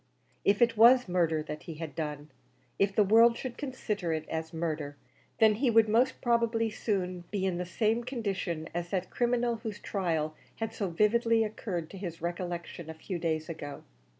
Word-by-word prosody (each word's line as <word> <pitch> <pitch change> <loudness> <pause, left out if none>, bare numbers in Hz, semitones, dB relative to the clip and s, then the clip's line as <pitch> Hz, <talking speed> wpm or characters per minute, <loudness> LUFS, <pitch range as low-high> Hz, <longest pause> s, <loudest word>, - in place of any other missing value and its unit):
If 205 +4 +4
it 230 -1 +2
was 245 +2 +7
murder 165 -4 +1
that 150 0 -6
he 165 - -5
had 160 -1 -6
done 150 -2 -5 0.5
if 195 0 +2
the 210 - +5
world 230 +3 +6
should 255 -2 -5
consider 215 - -3
it 155 0 -3
as 160 0 -3
murder 155 -3 -3 0.4
then 220 -1 +6
he 245 +5 +1
would 225 -1 +5
most 240 +5 +2
probably 230 -2 +2
soon 185 -5 -2
be 195 -2 -1
in 180 -2 -1
the 180 - -3
same 220 +5 +1
condition 195 - -3
as 175 0 -3
that 185 -1 -2
criminal 240 -1 +1
whose 220 -2 -6
trial 165 -7 -1 0.2
had 225 0 -4
so 205 -3 -2
vividly 225 +5 +3
occurred 200 -6 -4
to 195 - -9
his 170 -4 -5
recollection 170 -1 -4
a 160 - -6
few 175 +2 -5
days 160 -2 -1
ago. 145 -3 -7
195 Hz, 180 wpm, -30 LUFS, 165-225 Hz, 0.5 s, was